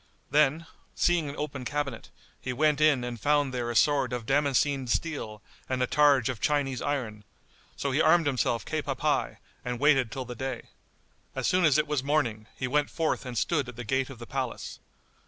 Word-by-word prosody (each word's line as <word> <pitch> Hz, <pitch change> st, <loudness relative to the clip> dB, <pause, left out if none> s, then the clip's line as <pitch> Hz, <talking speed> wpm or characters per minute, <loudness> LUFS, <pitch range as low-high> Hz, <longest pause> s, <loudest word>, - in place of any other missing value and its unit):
Then, 150 Hz, +3 st, +3 dB, 0.3 s
seeing 170 Hz, -4 st, +2 dB
an 140 Hz, -, -7 dB
open 140 Hz, -3 st, -4 dB
cabinet, 140 Hz, -2 st, -3 dB, 0.3 s
he 125 Hz, -, -4 dB
went 150 Hz, +3 st, +2 dB
in 150 Hz, -5 st, +4 dB
and 120 Hz, -1 st, -5 dB
found 145 Hz, +2 st, +2 dB
there 120 Hz, -2 st, -2 dB
a 120 Hz, -, -3 dB
sword 140 Hz, -1 st, +3 dB
of 120 Hz, -2 st, -4 dB
damascened[FN#73] 140 Hz, -1 st, +1 dB
steel 110 Hz, -9 st, -2 dB, 0.3 s
and 130 Hz, -1 st, 0 dB
a -, -, +3 dB
targe 140 Hz, -3 st, +4 dB
of 125 Hz, -5 st, -4 dB
Chinese 140 Hz, -4 st, 0 dB
iron; 115 Hz, -8 st, -3 dB, 0.5 s
so 140 Hz, -, -2 dB
he 145 Hz, +4 st, +2 dB
armed 165 Hz, +1 st, +5 dB
himself 125 Hz, -4 st, 0 dB
cap -, -, -3 dB
à -, -, -2 dB
pie -, -, 0 dB, 0.3 s
and 125 Hz, -1 st, -3 dB
waited 135 Hz, -5 st, +3 dB
till 130 Hz, -2 st, -4 dB
the 125 Hz, -, -6 dB
day. 130 Hz, 0 st, -5 dB, 0.7 s
As -, -, -2 dB
soon 180 Hz, 0 st, +3 dB
as 150 Hz, -2 st, +5 dB
it 150 Hz, -, +2 dB
was 145 Hz, -3 st, -1 dB
morning, 120 Hz, -7 st, 0 dB
he 125 Hz, -, -2 dB
went 145 Hz, +2 st, +1 dB
forth 160 Hz, -4 st, -1 dB
and 125 Hz, -2 st, -5 dB
stood 145 Hz, -3 st, 0 dB
at 125 Hz, -, -9 dB
the 120 Hz, -, -6 dB
gate 130 Hz, +3 st, 0 dB
of 135 Hz, -, -9 dB
the 120 Hz, -, -9 dB
palace. 130 Hz, -1 st, -4 dB
135 Hz, 200 wpm, -28 LUFS, 125-150 Hz, 0.7 s, armed